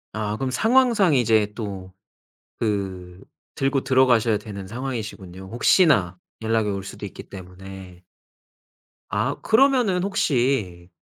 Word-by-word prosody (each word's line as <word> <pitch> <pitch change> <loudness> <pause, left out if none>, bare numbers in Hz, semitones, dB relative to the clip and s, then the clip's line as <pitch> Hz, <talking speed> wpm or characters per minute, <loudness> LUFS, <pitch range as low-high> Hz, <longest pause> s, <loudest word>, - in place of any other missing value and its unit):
아 105 -1 -2
그럼 135 +1 -2
상황상 225 - +3
이제 110 -4 +2
또 95 -4 -7 0.7
그 95 -4 -3 0.4
들고 135 0 0
들어가셔야 120 -4 +3
되는 100 -2 -7
상황이시군요, 105 -6 -6
혹시나 115 - +3 0.2
연락이 110 -1 0
올 100 -1 -3
수도 - - -8
있기 - - -10
때문에. 95 -1 -11 1.1
아 - - -1
그러면은 235 -7 +3
혹시 125 - -1
110 Hz, 250 characters per minute, -23 LUFS, 95-135 Hz, 1.1 s, 상황상